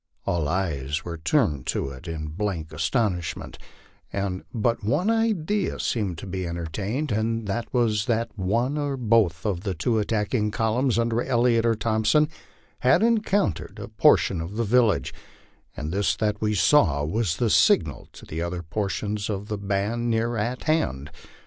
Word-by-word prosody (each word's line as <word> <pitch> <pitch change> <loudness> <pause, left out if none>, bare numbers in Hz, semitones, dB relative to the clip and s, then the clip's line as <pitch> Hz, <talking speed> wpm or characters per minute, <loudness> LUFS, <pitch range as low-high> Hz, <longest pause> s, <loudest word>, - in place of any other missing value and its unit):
All 85 -4 0
eyes 80 -3 -2
were 85 -2 -5
turned 80 - +1
to - - -1
it 70 +5 -10
in 80 -2 -4
blank 85 -2 -3
astonishment, 85 +3 -1 0.5
and 95 -2 -2
but 115 -1 0
one 150 - +1
idea 210 -4 0
seemed 100 -7 -1
to - - -7
be 95 -1 -4
entertained, 95 - -3
and 110 +1 0
that 110 +4 -3
was 110 -4 +1
that 115 -1 0
one 115 +9 0
or 140 -2 -2
both 110 -9 +2
of 95 -5 -1
the 95 -2 -3
two 110 +7 +1
attacking 105 +1 0
columns 115 +3 +1
under 115 0 +1
Elliot 120 -2 +2
or 115 - +3
Thompson 110 +7 +2 0.5
had 130 - +4
encountered 210 - +1
a - - -7
portion 90 -4 +3
of 85 +5 -6
the 115 - 0
village, 115 0 +2 0.6
and 75 +2 -4
this 100 +1 +1
that 105 -1 -1
we 105 -1 +1
saw 85 - +4
was 85 0 -1
the 115 -3 +1
signal - - +3
to 80 +2 -7
other 85 0 -3
portions 100 +4 -2
of 105 +1 -4
the 105 - -2
band 100 +4 -1
near 115 +1 0
at 115 +4 -2
hand. 80 - 0
105 Hz, 160 wpm, -25 LUFS, 90-120 Hz, 0.6 s, had